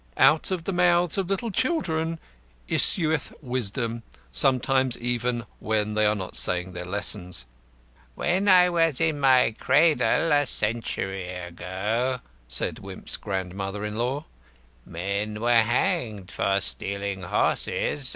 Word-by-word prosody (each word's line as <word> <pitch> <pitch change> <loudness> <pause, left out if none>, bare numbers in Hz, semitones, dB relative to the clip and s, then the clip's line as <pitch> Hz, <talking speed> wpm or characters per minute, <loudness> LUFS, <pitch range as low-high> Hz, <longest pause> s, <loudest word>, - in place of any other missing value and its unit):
Out 150 +4 +4
of 185 -3 -2
the 195 - -3
mouths 175 0 +3
of 190 -2 -3
little 210 +4 -2
children 165 - -1 0.5
issueth 160 - +2
wisdom; 120 -2 -2 0.3
sometimes 130 - +2
even 120 -1 -2
when 105 -1 -1
they 105 0 +2
are 105 - +1
not 95 -3 -6
saying 90 0 +4
their 90 0 -7
lessons. 90 - 0 0.7
"When 185 +4 0
I 180 -2 +7
was 165 -5 +1
in 160 -3 0
my 130 -5 +4
cradle, 160 +1 +3
a 145 -1 +3
century 95 -4 0
ago," 95 +8 -3 0.3
said - - -2
Wimp's - - -4
grandmother 95 +2 -4
in 105 0 -5
law, 130 +6 -2 0.6
"men 100 +5 -4
were 120 0 +4
hanged 115 - -1
for 100 0 0
stealing 100 0 -1
horses." 130 +8 -1
120 Hz, 125 wpm, -25 LUFS, 100-160 Hz, 0.7 s, I